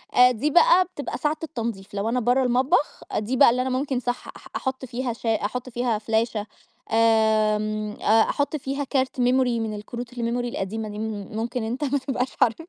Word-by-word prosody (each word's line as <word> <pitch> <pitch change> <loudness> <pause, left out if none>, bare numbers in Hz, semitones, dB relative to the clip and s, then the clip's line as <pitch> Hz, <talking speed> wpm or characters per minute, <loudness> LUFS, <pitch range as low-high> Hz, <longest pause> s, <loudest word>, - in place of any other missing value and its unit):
آآ 250 0 +7
دي 250 +6 -1
بقى 370 - +6
بتبقى 335 -5 -6
ساعة 300 +1 0
التنضيف 230 -10 -5
لو 205 +2 -1
أنا 250 - +1
بره 245 +3 +2
المطبخ 255 +4 +1
دي 235 +5 -1
بقى 280 - +8
اللي 250 +2 +1
أنا 260 - -1
ممكن 260 0 -1
صح 245 0 -3
أح - - -13
أحط 265 0 -3
فيها 250 0 -3
شا 225 -1 0
أحط 250 +4 -4
فيها 240 -2 0
فلاشة 220 -1 -1 0.4
آمم 215 -1 +2
أ 220 +2 +5
أحط 285 +1 -1
فيها 275 +1 -3
كارت 265 -1 -1
memory 250 -1 +2
من 220 -1 -3
الكروت 235 +4 -7
الmemory 245 - -8 0.3
القديمة 220 -1 -4
دي، 210 0 -7
م - - -3 0.3
م - - -8
ممكن 235 +1 -2
أنت 240 +6 -3
ما 285 0 +1
تبقاش 260 -1 -2
عارف 225 - +4
245 Hz, 195 wpm, -24 LUFS, 220-260 Hz, 0.4 s, بقى